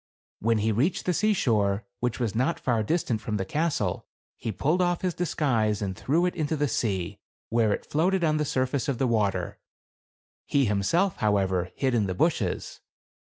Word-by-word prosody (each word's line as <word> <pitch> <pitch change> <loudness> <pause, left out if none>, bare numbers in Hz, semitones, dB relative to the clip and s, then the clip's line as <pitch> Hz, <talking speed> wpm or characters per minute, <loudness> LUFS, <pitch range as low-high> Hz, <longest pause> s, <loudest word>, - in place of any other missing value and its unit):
When 115 +1 +2
he 110 +1 +1
reached 135 - 0
the 180 - +2
seashore, 110 - +1
which 125 0 -1
was 115 -5 -1
not 130 +9 0
far 120 -4 +1
distant 115 -3 0
from 110 -1 -2
the 95 - -2
castle, 145 - -1 0.3
he 115 - -4
pulled 155 - +1
off 175 -1 +1
his 180 -2 0
disguise 120 -12 0
and 95 -3 -3
threw 155 - +1
it 180 - 0
into 155 -2 -1
the 145 0 +1
sea, 95 -9 -2 0.3
where 115 -2 +2
it - - -2
floated 180 +4 +1
on 155 -1 +2
the 150 - +1
surface 130 +1 -1
of 140 -4 0
the 135 - +1
water. 110 -5 0 0.9
He, 140 -2 +3
him 100 -2 +1
self, 175 - +1
however, 95 -4 +1
hid 130 -2 0
in 110 -4 +2
the 95 - -2
bushes. - - 0
120 Hz, 185 wpm, -27 LUFS, 105-155 Hz, 0.9 s, He